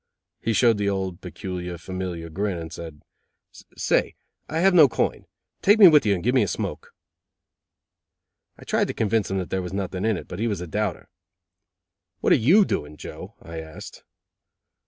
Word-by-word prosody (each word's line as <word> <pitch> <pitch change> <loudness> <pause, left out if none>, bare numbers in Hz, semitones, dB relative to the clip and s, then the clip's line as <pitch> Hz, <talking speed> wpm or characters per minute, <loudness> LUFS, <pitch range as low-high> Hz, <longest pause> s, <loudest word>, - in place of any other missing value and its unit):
He 115 - -1
showed 115 -1 +3
the 100 -1 +1
old 95 -3 -3
peculiar, 90 -1 -6
familiar 90 -1 -5
grin, 100 +1 -2
and 80 -1 -7
said: 80 -3 -9 0.7
"Say, - - +1 0.3
I 155 - -3
have 190 +3 +4
no 160 -5 +8
coin. - - -2 0.3
Take 205 +3 +5
me 205 -3 +10
with 150 -8 +5
you 100 - +3
and 90 - -6
give 125 +3 +2
me 130 - +4
a 105 - +1
smoke." - - -5 1.6
I - - -13
tried - - 0
to - - -5
convince 110 -1 0
him 95 - -1
that 90 -2 -4
there 95 - 0
was 90 0 -6
nothing 95 -1 -3
in 110 -3 +1
it, - - -9
but 90 - -7
he 115 - 0
was 105 -5 -2
a 90 - -5
doubter. 105 +3 -3 1.1
"What - - +3
are - - +7
you 200 +3 +7
doing, 75 - -3
Joe?" - - -9
I 80 0 -7
asked. 80 -1 -10
95 Hz, 185 wpm, -24 LUFS, 90-115 Hz, 1.6 s, me